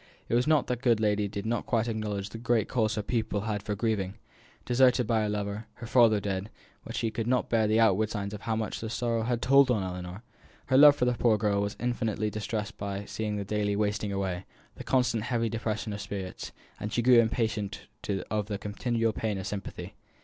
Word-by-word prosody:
It -, -, -2 dB
was 120 Hz, +4 st, +3 dB
not 155 Hz, -3 st, +4 dB
that 125 Hz, -1 st, -2 dB
the -, -, -25 dB
good 115 Hz, -3 st, +4 dB
lady 105 Hz, -1 st, +1 dB
did 100 Hz, 0 st, -5 dB
not 115 Hz, +1 st, -1 dB
quite 115 Hz, -1 st, +1 dB
acknowledge 105 Hz, -3 st, -3 dB
the 115 Hz, -, -8 dB
great 120 Hz, -2 st, +1 dB
cause 110 Hz, -3 st, 0 dB
her 105 Hz, -, -2 dB
pupil 110 Hz, -2 st, -1 dB
had 105 Hz, -1 st, -2 dB
for 105 Hz, +1 st, -3 dB
grieving 100 Hz, -3 st, -1 dB, 0.5 s
deserted 125 Hz, 0 st, +4 dB
by 110 Hz, 0 st, +2 dB
her 105 Hz, -, 0 dB
lover, 105 Hz, +1 st, -3 dB
her 120 Hz, -, -9 dB
father 115 Hz, -3 st, +5 dB
dead 100 Hz, 0 st, -3 dB, 0.3 s
but -, -, -8 dB
that -, -, -6 dB
she 115 Hz, -, 0 dB
could 115 Hz, 0 st, -3 dB
not 125 Hz, 0 st, +1 dB
bear 110 Hz, -2 st, +3 dB
the 110 Hz, +1 st, +3 dB
outward 110 Hz, -1 st, +3 dB
signs 100 Hz, -2 st, -4 dB
of 105 Hz, -, -7 dB
how 110 Hz, -, -1 dB
much 110 Hz, -2 st, -3 dB
these 110 Hz, 0 st, -4 dB
sorrows 115 Hz, -1 st, -1 dB
had 120 Hz, -1 st, -1 dB
told 135 Hz, +1 st, +6 dB
on 110 Hz, -6 st, +2 dB
Ellinor. 90 Hz, +2 st, -6 dB, 0.4 s
Her 130 Hz, -, +3 dB
love 145 Hz, 0 st, +9 dB
for 125 Hz, -, +1 dB
the 125 Hz, -, +2 dB
poor 115 Hz, -2 st, +3 dB
girl 105 Hz, -1 st, +1 dB
was 100 Hz, +1 st, -3 dB
infinitely 115 Hz, -3 st, -1 dB
distressed 110 Hz, 0 st, -4 dB
by 100 Hz, 0 st, -4 dB
seeing 105 Hz, 0 st, -3 dB
the 100 Hz, -1 st, -3 dB
daily 105 Hz, 0 st, 0 dB
wasting 105 Hz, 0 st, -1 dB
away, 95 Hz, -2 st, -2 dB, 0.3 s
the -, -, -8 dB
constant 125 Hz, -4 st, +1 dB
heavy 115 Hz, -2 st, 0 dB
depression 110 Hz, -1 st, -3 dB
of 100 Hz, -, -5 dB
spirits, 95 Hz, -2 st, -6 dB, 0.3 s
and 105 Hz, 0 st, -4 dB
she 120 Hz, -, 0 dB
grew 125 Hz, 0 st, +7 dB
impatient 110 Hz, -3 st, 0 dB, 0.5 s
of 105 Hz, -1 st, -1 dB
the 105 Hz, -2 st, -3 dB
continual 115 Hz, +2 st, -1 dB
pain 105 Hz, -2 st, -2 dB
of 95 Hz, -, -5 dB
sympathy. 100 Hz, 0 st, -6 dB
110 Hz, 220 wpm, -28 LUFS, 105-115 Hz, 0.5 s, love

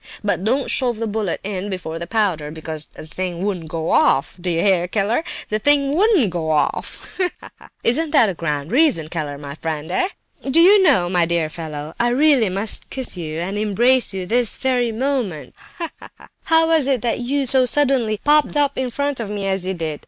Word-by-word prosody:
But 205 Hz, -3 st, -1 dB
don't 255 Hz, +6 st, 0 dB
shove 245 Hz, -3 st, +1 dB
the 225 Hz, -, -3 dB
bullet 210 Hz, -4 st, -2 dB
in 200 Hz, 0 st, -4 dB
before 175 Hz, -4 st, -5 dB
the 170 Hz, -, -6 dB
powder, 185 Hz, -9 st, 0 dB
because 155 Hz, 0 st, -6 dB
the -, -, -12 dB
thing 180 Hz, +2 st, -4 dB
wouldn't 180 Hz, -6 st, -3 dB
go 160 Hz, 0 st, -3 dB
off—do 185 Hz, -, +1 dB
you 165 Hz, -1 st, 0 dB
hear, 180 Hz, -1 st, +2 dB
Keller, 215 Hz, -, 0 dB, 0.3 s
the 215 Hz, -, -1 dB
thing 280 Hz, +3 st, +4 dB
wouldn't 370 Hz, -, +3 dB
go 165 Hz, -2 st, -3 dB
off! 155 Hz, -1 st, -2 dB
Ha, 365 Hz, -1 st, +2 dB
ha, -, -, -13 dB
ha! -, -, -15 dB, 0.2 s
Isn't 305 Hz, +7 st, +2 dB
that 280 Hz, -7 st, +4 dB
a 195 Hz, -, -2 dB
grand 150 Hz, -3 st, -3 dB
reason, 250 Hz, -, +2 dB
Keller, 150 Hz, -4 st, -4 dB
my 140 Hz, -1 st, -8 dB
friend, 160 Hz, +1 st, -5 dB
eh? 365 Hz, -, +1 dB, 0.4 s
Do 280 Hz, -, +3 dB
you 390 Hz, +4 st, +7 dB
know, 275 Hz, -, +4 dB
my 175 Hz, -1 st, +2 dB
dear 170 Hz, -2 st, 0 dB
fellow, 155 Hz, -2 st, -7 dB
I 240 Hz, -, +2 dB
really 265 Hz, -4 st, +3 dB
must 200 Hz, +4 st, -2 dB
kiss 260 Hz, -5 st, -4 dB
you, 160 Hz, -3 st, -5 dB
and 195 Hz, +4 st, -3 dB
embrace 235 Hz, +5 st, +2 dB
you, 190 Hz, -2 st, -4 dB
this 235 Hz, +3 st, +1 dB
very 250 Hz, -3 st, 0 dB
moment. 235 Hz, -, -3 dB, 0.2 s
Ha, 335 Hz, -2 st, -4 dB
ha! -, -, -16 dB, 0.2 s
How 325 Hz, 0 st, +4 dB
was 320 Hz, -4 st, +2 dB
it 255 Hz, -4 st, 0 dB
you 275 Hz, +3 st, -1 dB
so 260 Hz, 0 st, +5 dB
suddenly 255 Hz, -7 st, +2 dB
popped 300 Hz, 0 st, +3 dB
up 285 Hz, -2 st, +1 dB
in 260 Hz, -1 st, -1 dB
front 285 Hz, +2 st, -2 dB
of 225 Hz, -3 st, -4 dB
me 205 Hz, -1 st, -4 dB
as 190 Hz, -1 st, -1 dB
you 190 Hz, -, -2 dB
did? 160 Hz, -3 st, -3 dB
210 Hz, 205 wpm, -20 LUFS, 170-265 Hz, 0.4 s, you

